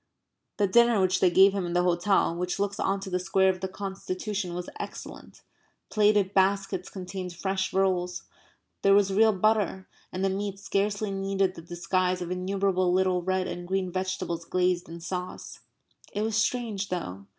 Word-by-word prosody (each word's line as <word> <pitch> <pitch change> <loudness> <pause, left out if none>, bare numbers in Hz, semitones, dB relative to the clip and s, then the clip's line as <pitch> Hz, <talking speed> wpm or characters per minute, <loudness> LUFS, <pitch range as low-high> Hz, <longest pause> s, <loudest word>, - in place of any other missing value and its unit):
The 205 - +3
dinner 235 +2 +4
which 185 0 +2
they 185 - +5
gave 190 +2 +6
him 200 -2 -1
in 175 -1 -3
the 180 0 +2
hotel 180 +1 +2
which 180 +1 -2
looks 200 0 -2
on 195 +1 0
to 195 - -7
the 180 - +1
Square 190 +1 +2
of 185 -1 -1
the 190 - -1
Constitution 190 0 -4
was 180 0 -5
excellent. - - -9 0.5
Plated 205 -2 +3
baskets 195 -1 +1
contained 185 -1 -6
fresh 190 +2 -2
rolls. 180 -2 0 0.6
There 195 0 +5
was 200 -1 +3
real 220 +2 +5
butter. 205 -1 +1 0.2
And 185 +1 -2
the - - +2
meat 200 0 -3
scarcely 200 +1 -1
needed 195 -1 0
the 165 - -10
disguise 180 +2 -1
of 175 -1 -5
innumerable 185 0 0
little 185 0 +2
red 185 +1 0
and 175 -1 -6
green 190 -1 -1
vegetables 185 -2 -3
glazed 180 0 0
in 170 0 -8
sauce. 180 +1 -6 0.5
It 210 - -2
was 220 -1 -1
strange, 220 -3 0
though. 100 - -5
190 Hz, 175 wpm, -27 LUFS, 180-200 Hz, 0.6 s, gave